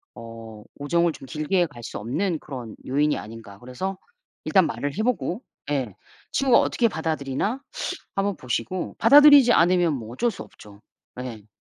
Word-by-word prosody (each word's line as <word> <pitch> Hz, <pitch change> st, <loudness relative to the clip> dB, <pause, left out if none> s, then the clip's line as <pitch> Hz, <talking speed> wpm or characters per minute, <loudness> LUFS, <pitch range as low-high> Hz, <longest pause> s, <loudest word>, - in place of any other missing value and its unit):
어 115 Hz, -2 st, -10 dB, 0.2 s
우정을 170 Hz, +3 st, +1 dB
좀 -, -, -11 dB
길게 165 Hz, +5 st, 0 dB
갈 120 Hz, -6 st, -13 dB
수 -, -, -6 dB
없는 155 Hz, -, -2 dB
그런 125 Hz, -6 st, -8 dB
요인이 145 Hz, +3 st, +1 dB
아닌가. 105 Hz, +1 st, -10 dB
그래서 185 Hz, +11 st, -5 dB, 0.5 s
일단 190 Hz, -3 st, +4 dB
말을 140 Hz, +7 st, -4 dB
해 215 Hz, -, 0 dB
보고 235 Hz, -4 st, -1 dB, 0.3 s
예 130 Hz, -9 st, -2 dB, 0.4 s
친구가 265 Hz, -3 st, +4 dB
어떻게 235 Hz, -, +1 dB
받아들이나 160 Hz, -, -2 dB, 0.5 s
한번 200 Hz, 0 st, 0 dB
보시고 125 Hz, +9 st, -3 dB
받아들이지 285 Hz, 0 st, +8 dB
않으면 175 Hz, -1 st, +3 dB
뭐 115 Hz, -5 st, -6 dB
어쩔 240 Hz, -, +1 dB
수 -, -, -8 dB
없죠. 105 Hz, 0 st, -16 dB, 0.4 s
예. 115 Hz, -5 st, -8 dB
150 Hz, 315 characters per minute, -24 LUFS, 120-195 Hz, 0.5 s, 받아들이지